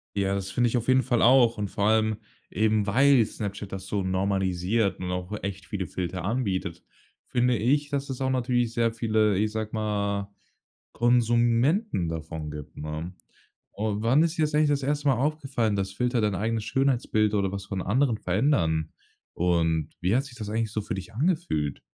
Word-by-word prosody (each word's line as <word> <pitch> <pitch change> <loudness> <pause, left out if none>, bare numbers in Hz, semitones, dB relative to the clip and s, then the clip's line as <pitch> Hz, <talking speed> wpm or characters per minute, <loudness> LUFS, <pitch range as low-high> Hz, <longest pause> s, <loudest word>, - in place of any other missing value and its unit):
Ja, 100 -1 0
das 100 -1 -3
finde 120 -1 +2
ich 120 - 0
auf 120 +1 -3
jeden 130 0 +4
Fall 120 -2 +1
auch. 120 -2 +5
Und 100 -1 -3
vor 100 - -1
allem 110 0 +2 0.3
eben, 110 0 +1
weil 135 +2 +5
Snapchat 100 -2 -6
das 95 -1 -6
so 100 -2 -1
normalisiert 95 +2 0
und 90 0 -3
auch 90 +1 -4
echt 95 -1 -5
viele 95 0 -4
Filter 90 0 -4
anbietet, 100 -5 -2 0.4
finde 125 0 +2
ich, 145 +7 +1
dass 140 -1 -3
es 130 0 -5
auch 130 - +1
natürlich 120 -2 0
sehr 115 -1 +1
viele, 110 -3 +1
ich 105 +2 +1
sage 110 0 -4
mal, 100 -2 -2 0.6
Konsumenten 120 - +2
davon 80 -1 -5
gibt, 75 -1 -9
ne? 75 +4 -5 0.6
Oh, 105 0 -2
wann 125 +8 +3
ist 170 +1 -1
dir - - +1
das 150 0 0
eigentlich 150 0 +3
das 145 -1 +1
1. 145 +1 -1
Mal 135 - +4
aufgefallen, 135 -6 0
dass 95 0 -2
Filter 125 +3 0
dein 105 -2 +1
eigenes 110 +2 -1
Schönheitsbild 120 -6 +1
oder 100 -2 +1
was 100 -1 -5
von 95 -2 -4
anderen 120 +3 +1
verändern? 90 - +1 0.4
Und 80 -3 +1
wie 90 +4 +1
hat 135 - 0
sich 135 -4 -11
das 105 -3 -5
eigentlich 110 0 -1
so 110 - -1
für 100 - -4
dich 95 0 -8
angefühlt? 140 - -1
110 Hz, 185 wpm, -26 LUFS, 95-125 Hz, 0.6 s, auch